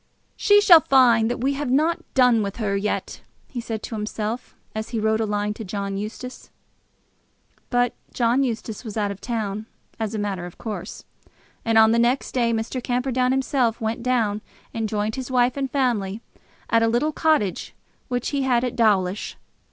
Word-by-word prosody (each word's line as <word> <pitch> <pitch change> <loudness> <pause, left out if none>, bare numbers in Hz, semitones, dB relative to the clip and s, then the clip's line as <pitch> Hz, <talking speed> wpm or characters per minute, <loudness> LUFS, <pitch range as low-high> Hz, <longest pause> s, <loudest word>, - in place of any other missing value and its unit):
"She 410 -1 +5
shall 355 -5 +9
find 240 -6 +4
that 240 - -3
we 275 +2 +1
have 280 -1 -3
not 310 +6 +2 0.2
done 250 -4 +5
with 200 -1 -3
her 210 -4 -1
yet," 200 +1 -2 0.3
he 245 - -5
said 225 -2 -5
to - - -6
himself, 215 +2 -4 0.2
as 220 0 -4
he 230 - -2
wrote 220 0 +1
a 220 - 0
line 210 0 -1
to 220 - -8
John 200 0 -4
Eustace. 220 +5 -7 1.2
But 245 -1 +2 0.2
John 240 +2 +2
Eustace 225 -4 -3
was 220 -2 -6
out 205 -1 0
of 200 - -9
town, 215 -2 -3 0.3
as 220 0 -2
a - - -1
matter 195 -4 -3
of 175 - -13
course; 220 -2 -6 0.6
and 225 -1 +2
on 220 0 +7
the 230 - +3
next 245 +3 +1
day 235 -2 +1
Mr. 230 +3 -2
Camperdown 250 0 0
himself 260 -3 +1
went 220 0 -2
down 230 -4 0 0.3
and 225 -2 -2
joined 215 +2 -2
his 260 -1 -5
wife 250 -1 +2
and 275 -1 -2
family 230 -7 0 0.5
at 230 - +3
a 225 - +3
little 240 +7 +1
cottage 305 - 0 0.3
which 245 -1 -2
he 280 -1 -1
had 250 -2 +2
at 250 - -2
Dawlish. 205 -4 +1
230 Hz, 185 wpm, -23 LUFS, 215-255 Hz, 1.2 s, shall